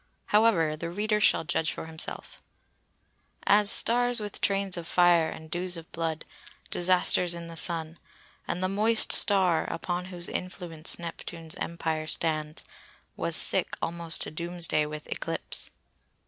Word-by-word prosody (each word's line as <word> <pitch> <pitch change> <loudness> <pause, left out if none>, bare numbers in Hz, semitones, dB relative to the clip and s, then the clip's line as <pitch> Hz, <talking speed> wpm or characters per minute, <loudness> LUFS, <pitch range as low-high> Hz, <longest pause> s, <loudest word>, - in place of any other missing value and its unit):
However 200 -8 +3
the 170 +2 -6
reader 210 +4 -1
shall - - +3
judge 160 -1 -1
for - - -7
himself:— 160 0 -6 1.0
"As 205 0 +4
stars 245 +2 +4
with 210 -1 -7
trains 195 -1 0
of 170 -2 -6
fire 175 -2 +3
and 160 0 -11
dews 180 +1 -1
of 165 -1 -12
blood, 165 -1 -4 0.5
Disasters 180 -1 +3
in 170 0 -8
the 165 - -9
Sun; 165 -1 0 0.5
and 180 - -3
the - - +1
moist 215 +4 +2
star, 185 -5 +3
Upon 175 +2 -4
whose 180 -2 -3
influence 175 -3 -2
Neptune's 165 -1 -7
Empire 160 -2 -4
stands, 155 -1 -3 0.5
Was - - +1
sick - - +5
almost 165 0 0
to - - -7
doomsday 170 -2 0
with 150 0 -8
eclipse." - - -1
170 Hz, 140 wpm, -27 LUFS, 160-185 Hz, 1.0 s, sick